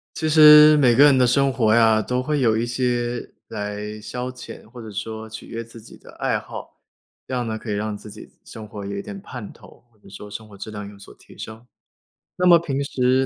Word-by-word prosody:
其 160 - -2
实 150 0 +8
每 125 -4 +4
个 140 - +7
人 145 -2 +6
的 125 - +4
生 135 +2 +2
活 115 -4 +2
呀， 110 -2 +4
都 125 +4 -2
会 150 +2 -1
有 115 -4 +2
一 115 +2 -1
些 120 0 -2 0.2
来 105 +1 -6
消 125 +4 -5
遣， 125 -1 -11
或 120 +2 -12
者 110 - -9
说 110 +2 -6
取 110 - -10
悦 115 0 -6
自 115 0 -13
己 110 - -15
的 - - -16
爱 - - -1
好， - - -11 0.5
这 - - -9
样 125 -2 -2
呢 110 -1 -3
可 110 0 -7
以 - - -1
让 105 0 -3
自 105 +1 -12
己 - - -13
生 110 -1 -10
活 105 -2 -9
有 100 0 -5
一 100 - -4
点 195 - -9
盼 125 - -9
头， - - -18
或 110 - -32
者 - - -19
说 100 +1 -10
生 110 +1 -9
活 100 -1 -15
质 100 +3 -7
量 105 -1 -7
有 100 - -15
所 100 - -14
提 - - -19
升， 110 +1 -9 0.7
那 180 - 0
么 175 -1 +8
平 140 -5 -3
时 130 -1 +1
115 Hz, 260 characters per minute, -22 LUFS, 105-130 Hz, 0.7 s, 实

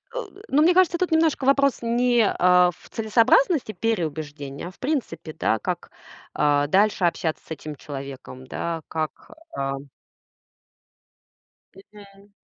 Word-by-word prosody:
Э, - - -1
д 395 - -15
но 290 - +3
мне 345 +3 +5
кажется, 360 -2 +4
тут 360 0 -1
немножко 320 -4 +2
вопрос 275 -1 +3
не, 240 0 +2
а, 180 0 +5
в - - -19
целесообразности 230 - +3
переубеждения, 155 -8 -3
а - - -8
в - - -26
принципе, 250 - -3
да, 110 -7 0
как, - - -4 0.4
а, 145 -1 +2
дальше 200 +2 +2
общаться 165 -2 -1
с - - -20
этим 155 -1 -6
человеком, 135 -2 -9
да, 165 +4 -4
как, 155 -1 -5 0.3
ам 135 0 -4 1.9
Мгм. 200 0 -17
190 Hz, 135 wpm, -24 LUFS, 150-250 Hz, 1.9 s, мне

